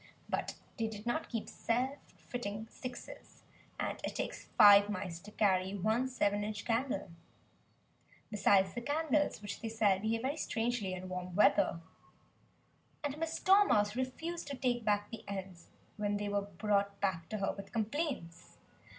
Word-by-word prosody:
But - - -2 0.2
they 225 - 0
did 215 0 -7
not 240 +7 -1
keep 230 -3 -3
"self 255 +5 -1 0.2
fitting 220 -3 -5
sixes"; 250 -1 -9 0.4
and - - -2
it - - -3
takes - - -4
five 205 0 +9
mice 185 -4 -4
to 200 - -12
carry 190 -2 +2
one 220 +6 +1
seven 205 -5 +1
inch 210 0 -4
candle. 230 -5 -1 1.2
Besides 195 -2 +4
the 240 - -4
candles 295 -3 +1
which 205 0 -5
they 225 - -3
sell 210 -4 +3
behave 225 +3 -1
very 280 +4 -1
strangely 225 -8 -1
in 185 0 -7
warm 180 -1 -5
weather. 175 -4 +4 1.2
And 290 +1 -3
Miss 325 0 -2
Dormouse 365 - +5
refused 320 +7 -3
to 280 -2 -4
take 245 -2 0
back 205 -1 +1
the 230 - -7
ends 190 -3 -6 0.3
when 205 -1 0
they 205 0 -2
were 205 0 +1
brought 200 +1 0
back 175 -5 -1
to 215 - -2
her 195 - 0
with 200 - -9
complaints. 230 - -3
210 Hz, 155 wpm, -34 LUFS, 200-245 Hz, 1.2 s, five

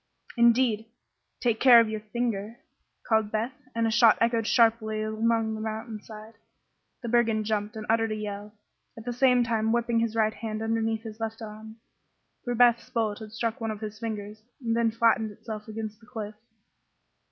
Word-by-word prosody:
"Indeed! 235 -2 +3 0.5
Take 235 -3 +1
care 250 -3 +8
of 230 - +4
your 215 0 -3
finger," 220 0 -3 0.5
called 220 -2 +2
Beth, 225 +4 -1 0.2
and 230 0 +1
a 225 - +1
shot 230 -1 +6
echoed 230 -1 +1
sharply 225 -2 +2
along 220 +1 0
the 215 - -5
mountain 220 0 -5
side. 215 +1 -11 0.7
The - - -4
brigand 225 -2 +2
jumped 210 0 -2
and 215 -1 -6
uttered 225 0 +2
a - - -1
yell, 210 0 -6 0.5
at 225 - -10
the 245 - -2
same 250 0 +4
time 225 -1 0
whipping 235 0 +1
his 230 -1 -1
right 220 -1 +2
hand 220 -1 -5
underneath 225 0 -1
his 220 -1 -9
left 225 0 -4
arm; 220 0 -9 0.7
for 245 -1 -2
Beth's 240 0 +4
bullet 225 -5 -1
had 215 -1 -9
struck 225 +1 -3
one 225 - -2
of 215 -1 -5
his 215 0 -6
fingers 215 -2 -5 0.2
and 230 -3 -1
then 230 -1 +2
flattened 225 -1 +2
itself 210 +1 -8
against 215 -1 -6
the 225 - -20
cliff. 220 -4 -6
225 Hz, 180 wpm, -27 LUFS, 215-230 Hz, 0.7 s, care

